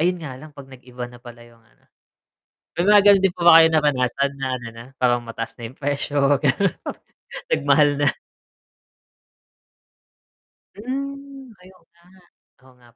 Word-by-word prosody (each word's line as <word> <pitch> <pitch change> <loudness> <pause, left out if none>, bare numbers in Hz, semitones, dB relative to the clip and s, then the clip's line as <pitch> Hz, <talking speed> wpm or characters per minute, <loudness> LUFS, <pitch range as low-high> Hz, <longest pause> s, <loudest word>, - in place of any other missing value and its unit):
Ayun 180 +2 0
nga 135 - -7
lang 155 - -12
'pag 135 -1 -12
nag-iba 125 -1 -9
na 120 0 -16
pala 120 -1 -13
'yong 120 -1 -21
ano. 115 0 -32 0.9
May 175 - -1
mga 210 0 +7
ganoon 200 -2 +6
din 190 -2 +1
po - - -12
ba 165 -1 +9
kayo 160 - +6
napadasan 140 -3 0
na 135 - -2
ano 120 -2 -9
na, 115 +1 -12
parang 120 -1 +1
mataas 115 0 -7
na 115 -2 -8
'yong 130 - -21
presyo? 145 0 -3 0.2
Ganoon. 155 +6 +1 0.8
Nagmahal 145 +1 +3
na. 145 -1 +2 2.6
Hmm, 275 +2 -7
ay, 185 - -17
oo 170 - -27
nga. 170 0 -29 0.6
Oo 130 -1 -20
nga 120 - -21
145 Hz, 155 wpm, -21 LUFS, 125-180 Hz, 2.6 s, ba